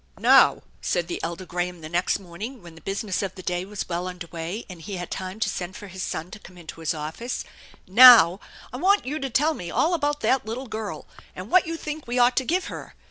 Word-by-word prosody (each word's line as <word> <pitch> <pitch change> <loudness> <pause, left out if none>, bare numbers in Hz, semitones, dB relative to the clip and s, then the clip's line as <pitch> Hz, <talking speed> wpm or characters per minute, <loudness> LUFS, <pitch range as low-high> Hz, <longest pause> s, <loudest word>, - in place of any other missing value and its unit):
"Now," - - +5 0.2
said 175 -1 -1
the - - -4
elder 170 +2 -5
Graham 175 -1 -3
the 155 - -7
next 175 +3 0
morning, 200 +6 -8
when 170 -1 -12
the 165 - -15
business 195 +2 -2
of 195 -2 -4
the 185 - -10
day 180 +1 -2
was 205 +1 -5
well 175 +1 -3
under 180 -1 -7
way 170 +6 -6
and 180 -3 -10
he 195 +4 -6
had 175 -1 -6
time 185 +2 -5
to - - +2
send 180 +1 -4
for 205 - -9
his 190 0 -7
son 175 -1 -4
to 215 - -9
come 180 -3 -15
into 165 -2 -10
his 160 0 -1
office, 160 +11 -5 0.3
" - - -23
now, 220 -4 +9 0.3
I - - -4
want 395 +8 +3
you 295 +4 -3
to 270 - -3
tell 295 +7 +2
me 175 - -7
all 335 - +1
about 295 -3 0
that 260 -1 +2
little 230 +5 -5
girl, 220 -3 -6 0.3
and - - -8
what 365 -2 +5
you 330 0 -3
think 305 -2 -6
we 240 +1 -2
ought 245 0 +4
to 265 - +3
give 360 +7 0
her. - - -8
195 Hz, 245 wpm, -24 LUFS, 175-255 Hz, 0.3 s, now